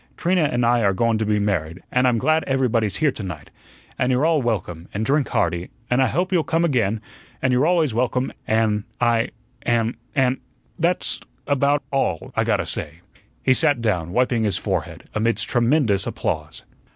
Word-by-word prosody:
Trina 180 -2 +2
and 120 -4 +1
I 120 0 +3
are 100 -3 +3
goin' 115 +2 +1
to 110 - -1
be 105 0 +2
married, 90 -5 -1
an' 125 +1 +3
I'm 120 -2 +3
glad 155 +7 +2
everybody's 120 -6 +1
here 155 -3 +2
to 115 - -8
night, 85 -7 -7 0.5
an' 125 - +2
you're 130 +3 +2
all 160 -3 +3
welcome, 90 -8 -3
an' 105 - -1
drink 140 +1 +1
hearty, 85 +1 -1 0.2
an' 125 - +3
I 130 - +4
hope 180 +9 -1
you'll 175 -4 +3
come 165 +3 +1
again, 115 -8 +1 0.4
an' 130 - +1
you're 130 +5 +3
always 165 -7 +2
welcome 125 +2 0
an' 110 -2 +1
I 120 -1 +2 0.3
an' 115 0 +1 0.2
an' 130 -2 +2 0.4
That's 175 +2 +1 0.3
about 140 +1 +2
all 95 - -1
I - - +2
gotta - - +1
say." 80 +3 -5 0.4
He 130 - +5
sat 135 +1 +2
down, 90 -8 -1
wiping 125 +1 +1
his 100 -5 +1
forehead, - - -3
amidst 115 +1 0
tremendous 120 -5 +2
applause. - - -3
120 Hz, 180 wpm, -22 LUFS, 105-135 Hz, 0.5 s, He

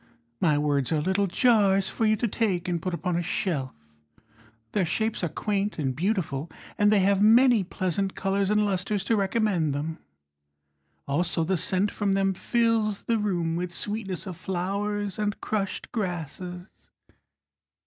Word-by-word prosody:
My 155 -4 +3
words 145 -2 0
are 155 - +2
little 190 +5 +1
jars 195 -2 +3
For 225 - 0
you 215 - +4
to 235 - -1
take 195 -5 -1
and 175 -2 -1
put 185 0 -2
upon 180 0 -2
a 175 - +1
shelf. 165 -7 -2 1.0
Their 200 - +1
shapes 220 +5 -1
are 175 - +1
quaint 205 +5 -2
and 135 -5 -1
beautiful, 165 - -1 0.3
And 205 0 +3
they 210 -2 +5
have 195 +1 +3
many 230 +1 +6
pleasant 190 +1 -2
colours 195 0 0
and 210 0 +3
lustres 195 0 -1
To 225 +4 +1
recommend 195 -7 +1
them. 160 +3 -4 1.1
Also 165 +4 0
the 190 +4 +1
scent 190 +4 +1
from 200 -2 0
them 195 0 +2
fills 225 -1 +1
the 230 -1 +1
room 175 -6 -1
With 175 +1 -3
sweetness 205 0 -3
of 185 -4 -6
flowers 200 +3 -2
and 210 0 -1
crushed 200 -3 -3
grasses. 180 - -4
195 Hz, 155 wpm, -26 LUFS, 175-210 Hz, 1.1 s, many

